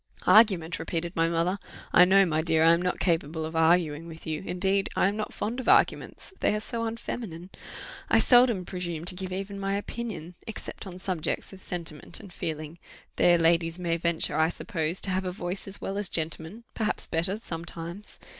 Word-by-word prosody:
"Argument!" 190 -7 +5
repeated 170 +1 -3
my 165 0 +2
mother: 170 +4 0 0.3
"I 180 - +8
know, 195 +1 +5
my 155 -2 0
dear, 160 -1 +2
I 165 - +7
am 170 +1 +3
not 180 0 -1
capable 160 -2 0
of 160 +1 -6
arguing 165 -1 +2
with 165 -1 -11
you 155 -1 -3
indeed 195 +2 0
I - - +3
am 200 - -1
not 215 0 -3
fond 235 +4 -3
of 260 - -1
arguments, - - +2
they - - +2
are - - -1
so 230 +1 -3
unfeminine: 215 -6 -6 0.6
I - - +5
seldom 240 -7 +5
presume 175 -3 -4
to 180 - +2
give 185 0 -5
even 195 +2 -5
my 195 0 -1
opinion, 205 -5 -5
except 220 -2 -6
on 180 -1 -8
subjects 185 -1 -2
of 190 - -11
sentiment 170 -5 -3
and 195 -4 -12
feeling; 155 +1 -5 0.4
there 175 -1 +5
ladies 165 0 +2
may 170 -2 -1
venture, 170 -1 +1
I 160 +1 +4
suppose, 170 -2 -2
to 195 - +2
have 185 +1 0
a 185 - -2
voice 180 +1 -4
as 195 - -5
well 195 +1 -3
as 205 -3 -1
gentlemen, 165 +6 -3
perhaps 215 -2 0
better, 175 +5 -1
sometimes. 170 +1 -7
180 Hz, 190 wpm, -27 LUFS, 165-195 Hz, 0.6 s, I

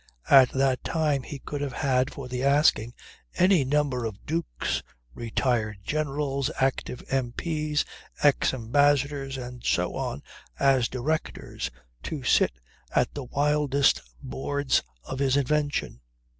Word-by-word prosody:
At 130 -2 +9
that 135 -1 +1
time 155 -4 +1
he 140 - -7
could 145 +1 -6
have 140 -3 -3
had 130 -2 +1
for 135 -2 -7
the 125 0 -3
asking 140 -5 +3 0.4
any 180 -4 +4
number 135 -3 0
of 110 -2 -6
Dukes, 165 +1 -2 0.3
retired 115 - -1
Generals, 140 -1 -1
active 130 -1 -1
M.P.'s, 150 +4 -1 0.4
ex 145 -2 +4
ambassadors 140 +2 +1
and 125 -1 -8
so - - +1
on 70 - -3 0.3
as 135 -3 +3
Directors 145 +5 -3 0.3
to 150 -5 -5
sit 125 - +3 0.4
at - - +2
the 140 -3 -5
wildest 145 +1 +2 0.2
boards 140 +1 0 0.2
of 130 - -6
his 135 -1 +2
invention. 145 - 0
135 Hz, 125 wpm, -26 LUFS, 125-145 Hz, 0.4 s, At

